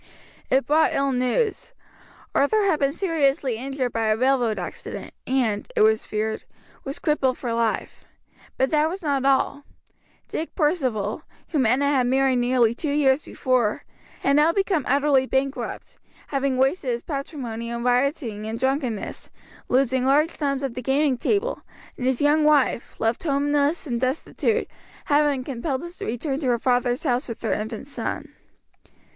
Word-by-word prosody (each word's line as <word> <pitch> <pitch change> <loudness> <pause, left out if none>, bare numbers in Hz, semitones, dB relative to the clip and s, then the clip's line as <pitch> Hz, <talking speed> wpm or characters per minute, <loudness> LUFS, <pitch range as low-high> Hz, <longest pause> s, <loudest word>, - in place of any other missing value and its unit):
It 265 +1 +3
brought 310 +2 +3
ill 275 0 +1
news. 330 - -1 0.6
Arthur 410 +10 +3
had 375 -6 +2
been 275 -1 +2
seriously 280 - 0
injured 260 0 -3
by 225 -1 0
a 215 0 +2
railroad 250 -3 +2
accident - - -7
and, 240 -6 0
it - - +2
was 220 0 +3
feared, 220 +1 -2 0.4
was 275 +1 -5
crippled 270 -4 +1
for 240 -3 -3
life. 230 -1 -1 0.5
But 265 +1 +1
that 305 0 +3
was 370 +2 -6
not 280 -3 0
all. 275 +1 +2 0.6
Dick 320 - -5
Percival 255 - 0 0.3
whom 275 -7 +2
Enna 260 +5 +2
had 265 -4 +2
married 265 0 +3
nearly 245 -2 +3
two 285 +4 -3
years 285 -1 +3
before 250 -7 0 0.4
had 280 +1 +3
now 305 +2 +5
become 380 -5 0
utterly 275 -1 +3
bankrupt, 270 +1 -3 0.3
having 275 -2 0
wasted 270 +2 +1
his 240 0 -2
patrimony 265 -6 -5
in 235 0 -4
rioting 245 -4 0
and 225 +1 -4
drunkenness, 260 -4 -2 0.4
losing 260 0 +2
large 295 +5 +3
sums 280 -2 -2
at 270 -3 -2
the 250 - -5
gaming 270 +2 +2
table; 410 - -1 0.3
and 255 - -3
his 260 -2 +1
young 300 +1 +4
wife, 295 -5 +2
left 225 +1 0
homeless 290 +1 +1
and 240 -4 -2
destitute, 320 - 0 0.4
had 295 0 +3
been 270 -3 -2
compelled 270 +4 -3
to - - -7
return 270 +4 -2
to 280 - -2
her 240 -1 +3
father's 245 +1 +1
house 250 -2 0
with 230 - -7
her 225 - +1
infant 220 +4 -4
son. 285 - -5
270 Hz, 160 wpm, -24 LUFS, 245-290 Hz, 0.6 s, now